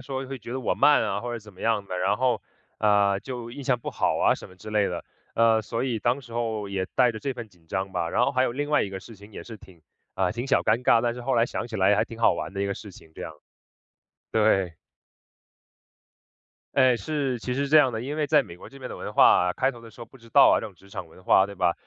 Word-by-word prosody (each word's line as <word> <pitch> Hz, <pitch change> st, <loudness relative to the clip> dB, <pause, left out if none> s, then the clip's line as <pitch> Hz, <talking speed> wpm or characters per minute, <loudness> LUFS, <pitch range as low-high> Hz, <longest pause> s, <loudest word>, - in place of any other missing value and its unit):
说 130 Hz, +1 st, -5 dB
会 135 Hz, 0 st, -6 dB
觉 120 Hz, -, -10 dB
得 130 Hz, -, -3 dB
我 -, -, 0 dB
慢 145 Hz, +1 st, +5 dB
啊， 100 Hz, +1 st, -1 dB
或 120 Hz, 0 st, -5 dB
者 120 Hz, -, -4 dB
怎 105 Hz, -1 st, -15 dB
么 -, -, -16 dB
样 110 Hz, -3 st, 0 dB
的， 90 Hz, -, -5 dB
然 95 Hz, +3 st, +1 dB
后， 125 Hz, -3 st, +1 dB, 0.4 s
呃， 100 Hz, -2 st, +3 dB
就 120 Hz, -3 st, -7 dB
印 135 Hz, +3 st, -8 dB
象 125 Hz, -3 st, +1 dB
不 -, -, -5 dB
好 -, -, 0 dB
啊， -, -, +4 dB
什 -, -, -10 dB
么 90 Hz, -, -16 dB
之 95 Hz, -, -11 dB
类 105 Hz, -2 st, +2 dB
的。 85 Hz, -1 st, -5 dB, 0.3 s
呃， 115 Hz, -1 st, +4 dB
所 115 Hz, +2 st, -3 dB
以 120 Hz, -4 st, -1 dB
当 120 Hz, +5 st, 0 dB
时 120 Hz, -3 st, -14 dB
候 110 Hz, -3 st, -2 dB
也 95 Hz, -1 st, -2 dB
带 125 Hz, -2 st, +4 dB
着 110 Hz, -, -6 dB
这 135 Hz, +3 st, -3 dB
份 120 Hz, -3 st, -8 dB
紧 85 Hz, -4 st, -27 dB
张 95 Hz, +2 st, -3 dB
吧。 85 Hz, 0 st, -2 dB
然 120 Hz, -, +1 dB
后 -, -, +1 dB
还 130 Hz, -1 st, +1 dB
有 125 Hz, -, 0 dB
另 145 Hz, +3 st, -3 dB
外 150 Hz, -, +3 dB
一 100 Hz, -, -4 dB
个 95 Hz, 0 st, -6 dB
事 110 Hz, +2 st, -13 dB
情 100 Hz, +2 st, -15 dB
也 -, -, -8 dB
是 115 Hz, -2 st, -10 dB
挺 95 Hz, -5 st, -18 dB, 0.3 s
啊， 90 Hz, -, +1 dB
挺 120 Hz, +3 st, -4 dB
小 135 Hz, -, +3 dB
尴 110 Hz, +3 st, +1 dB
尬， 115 Hz, -, +5 dB
但 120 Hz, 0 st, -1 dB
是 125 Hz, -, -8 dB
后 130 Hz, +1 st, 0 dB
来 115 Hz, 0 st, +3 dB
想 120 Hz, -, -4 dB
起 115 Hz, -, -6 dB
来 100 Hz, +1 st, +4 dB
还 -, -, +2 dB
挺 115 Hz, -, -11 dB
好 115 Hz, -, +4 dB
玩 80 Hz, +3 st, -5 dB
的 100 Hz, -, -4 dB
一 -, -, 0 dB
个 100 Hz, -, -2 dB
事 105 Hz, -, -10 dB
情 80 Hz, -3 st, -16 dB
这 -, -, -8 dB
样。 80 Hz, -, -6 dB, 1.0 s
对。 95 Hz, -6 st, +2 dB, 2.0 s
哎， 130 Hz, -3 st, +5 dB
是 135 Hz, +2 st, -2 dB
其 -, -, -12 dB
实 135 Hz, +3 st, -1 dB
是 -, -, -4 dB
这 155 Hz, -, +5 dB
样 145 Hz, -4 st, +6 dB
的。 110 Hz, -, -3 dB
因 140 Hz, +5 st, -4 dB
为 155 Hz, -1 st, 0 dB
在 150 Hz, 0 st, +5 dB
美 85 Hz, -5 st, -11 dB
国 -, -, -12 dB
这 140 Hz, -, -14 dB
边 130 Hz, -1 st, -7 dB
的 -, -, -7 dB
文 -, -, -6 dB
化 -, -, +6 dB, 0.2 s
啊， -, -, 0 dB
开 130 Hz, +8 st, 0 dB
头 120 Hz, -, -13 dB
的 115 Hz, -1 st, -13 dB
时 120 Hz, -, -17 dB
候 -, -, -6 dB
不 135 Hz, -, -18 dB
知 115 Hz, -2 st, -18 dB
道 -, -, +7 dB
啊， -, -, 0 dB
这 -, -, -5 dB
种 100 Hz, -, -13 dB
职 95 Hz, +3 st, -20 dB
场 95 Hz, -4 st, -7 dB
文 90 Hz, -, -17 dB
化， 95 Hz, -, +5 dB
对 100 Hz, 0 st, -7 dB
吧？ 85 Hz, -, +2 dB
115 Hz, 315 characters per minute, -25 LUFS, 100-125 Hz, 2.0 s, 道